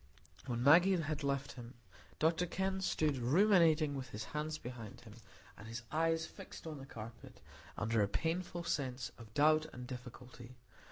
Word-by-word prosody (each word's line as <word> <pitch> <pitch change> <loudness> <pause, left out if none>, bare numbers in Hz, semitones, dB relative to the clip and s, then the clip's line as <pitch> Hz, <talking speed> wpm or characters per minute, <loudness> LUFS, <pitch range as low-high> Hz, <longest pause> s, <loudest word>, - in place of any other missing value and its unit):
When 120 -1 -1
Maggie 175 +7 +7
had 155 -1 -2
left 140 0 -1
him, 120 0 -10 0.4
Dr 165 +3 +2
Kenn 190 +2 -1
stood 155 -6 +1
ruminating 160 - +4
with 130 -2 -5
his 105 -1 -5
hands 150 +5 -3
behind 120 -5 -8
him, 110 -3 -12 0.4
and 105 - -11
his 115 +1 -6
eyes 165 0 +1
fixed - - -11
on 155 -3 -6
the 135 - -9
carpet, 115 -1 -10 0.4
under 115 -1 +1
a 100 - +3
painful 170 - -2
sense 130 -6 -2
of 115 -2 -12
doubt 155 +1 +4
and 125 0 -8
difficulty. 125 0 -9
140 Hz, 160 wpm, -36 LUFS, 120-160 Hz, 0.4 s, Maggie